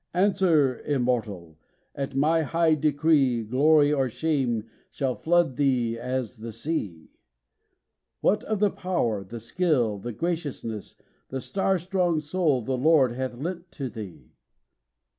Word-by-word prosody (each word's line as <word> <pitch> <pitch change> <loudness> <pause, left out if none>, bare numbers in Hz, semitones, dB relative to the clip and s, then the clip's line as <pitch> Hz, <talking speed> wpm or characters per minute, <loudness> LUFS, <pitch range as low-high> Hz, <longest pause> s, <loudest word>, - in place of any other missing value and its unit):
'Answer, 175 -8 +3
Immortal! 110 - -2 0.3
at 140 -1 -5
my 155 +4 +3
high 165 +1 +2
decree 145 -5 +2
Glory 145 +6 +4
or 135 -3 +1
shame 125 -6 -1 0.2
shall 135 -3 -1
flood 170 -4 +1
thee 125 -5 +1
as 125 -2 -3
the 115 +1 -7
sea: 105 - -4 1.1
What 210 - +2
of 215 - -1
the 205 0 +2
power, 120 - -1
the 115 +5 -8
skill, 120 - 0
the 120 +4 -5
graciousness, 145 - -4 0.3
The 135 - -3
star 195 +6 0
strong 180 -2 0
soul 150 -3 0
the 130 +3 -1
Lord 145 -3 +4
hath 130 0 -4
lent 170 +5 -6
to 135 -3 -4
thee? 105 -7 -9
140 Hz, 130 wpm, -26 LUFS, 120-165 Hz, 1.1 s, Glory